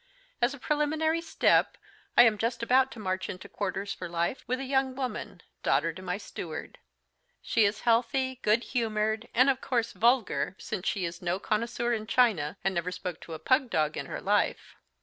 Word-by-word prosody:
As 245 +4 +2
a - - -12
preliminary 310 +4 0
step, 330 - +2 0.4
I - - +10
am 220 -3 +3
just 235 +1 -1
about 260 +2 +4
to 230 - -11
march 185 -2 -2
into 185 - -7
quarters 200 0 -3
for 180 - -7
life 170 +8 -1
with 255 +1 -1
a - - -3
young 265 -1 +1
woman, 245 -8 -5 0.2
daughter 160 +4 +2
to 185 - -10
my 180 0 -2
steward. 180 - -7 0.6
She 225 -2 +3
is 205 +1 0
healthy, 255 +2 +1
good 220 +3 +3
humoured, 220 -2 -1
and 255 +3 +6
of 265 -1 +2
course 235 -2 0
vulgar, 235 -5 +2
since 210 -5 -5
she 190 -3 0
is 170 0 -6
no 175 0 0
connoisseur 235 +3 -1
in 215 -1 -3
china, 205 -10 +2
and 195 0 +1
never 175 0 -2
spoke 180 -1 -5
to 165 - -7
a - - -5
pug 255 - +2
dog 155 -5 +1
in - - -4
her - - -5
life. - - 0
225 Hz, 190 wpm, -29 LUFS, 185-255 Hz, 0.6 s, I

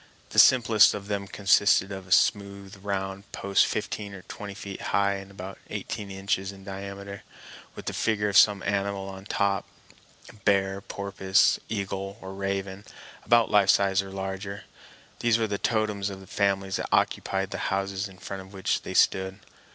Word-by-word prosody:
The - - +3
simplest 115 -4 +6
of 100 -1 -7
them 100 -1 -2
consisted 100 -1 +3
of 95 -2 -7
a - - -15
smooth, 100 0 +1
round 100 0 -4
post 100 0 +2
fifteen 100 -2 -4
or 90 - -11
twenty 100 -1 -8
feet 100 -2 -7
high 100 0 +1
and 95 0 -10
about 95 0 -9
eighteen 105 -1 -5
inches 95 0 -2
in 95 -1 -13
diameter, 100 0 -7 0.5
with - - -9
the - - -3
figure 105 -2 0
of 100 - -2
some 100 0 +6
animal 100 -1 -1
on 95 0 -9
top—a 100 -1 -4
bear, 100 -1 +1
porpoise, 95 -1 +1
eagle, 100 -1 -4
or 95 -2 -8
raven, 95 0 -3 0.4
about 120 -1 +4
life 100 -2 +4
size 100 -1 +4
or 95 - -9
larger. 95 +1 -5 0.6
These 120 -1 +3
were 115 - +1
the 100 -2 -3
totems 105 -3 0
of 95 -1 -8
the 95 - -13
families 95 0 0
that - - -4
occupied 95 0 +1
the - - -4
houses 95 +1 -1
in 95 - -15
front 95 +1 -7
of 95 +1 -14
which 95 -1 -1
they - - -7
stood. 95 0 +2
100 Hz, 170 wpm, -27 LUFS, 95-100 Hz, 0.6 s, simplest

